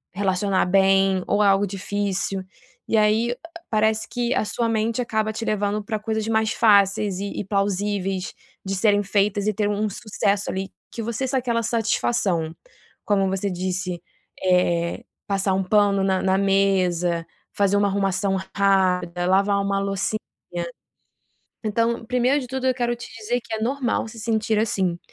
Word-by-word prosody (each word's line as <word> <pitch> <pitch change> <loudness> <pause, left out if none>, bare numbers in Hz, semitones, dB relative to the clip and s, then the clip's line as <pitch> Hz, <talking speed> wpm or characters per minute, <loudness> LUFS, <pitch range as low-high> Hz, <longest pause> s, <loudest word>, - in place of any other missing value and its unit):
relacionar 195 0 +1
bem, 195 0 +3
ou 205 +1 +2
algo 200 0 +4
difícil. 195 0 -2 0.4
E - - +1
aí, 220 +3 +2 0.3
parece 220 0 +1
que 240 0 -2
a - - +1
sua 230 +2 -1
mente 225 +2 0
acaba 220 -2 -1
te 225 - -5
levando 210 0 0
para 215 0 -3
coisas 220 0 -2
mais 220 -1 +1
fáceis 200 -2 +3
e 200 0 -3
e - - -2
plausíveis 195 -1 -1 0.3
de 195 0 -2
serem 205 +1 +3
feitas 205 +1 +1
e 215 - +2
ter 205 +1 0
um 210 +1 0
sucesso 200 -1 -1
ali 190 0 -4 0.2
que 230 - -5
você 235 +4 -2
sa 265 - 0
aquela 235 -2 -1
satisfação, 205 -7 0 0.5
como 195 -2 +2
você 195 +1 -1
disse, 180 -1 -3 0.4
eh, 180 +2 +1 0.2
passar 195 -1 +1
um 190 +1 +1
pano 200 0 +3
na 190 -1 +1
na 190 0 +2
mesa, 185 -4 +2 0.3
fazer 200 0 +2
uma 205 0 +3
arrumação 195 0 0 0.2
rápida, 180 -3 +2
lavar 200 +2 +3
uma 200 0 0
loucinha. 195 +2 -1 1.5
Então, 230 +2 0
1° 250 +4 +2
de 255 - -6
tudo 260 +1 -3
eu 260 - +3
quero 240 -1 -1
te 235 - -9
dizer 240 +3 -1
que 230 -1 -6
é 220 - -3
normal 250 -1 -1
se 225 +1 -11
sentir 220 -1 0
assim, 190 -5 0
205 Hz, 160 wpm, -23 LUFS, 190-220 Hz, 1.5 s, algo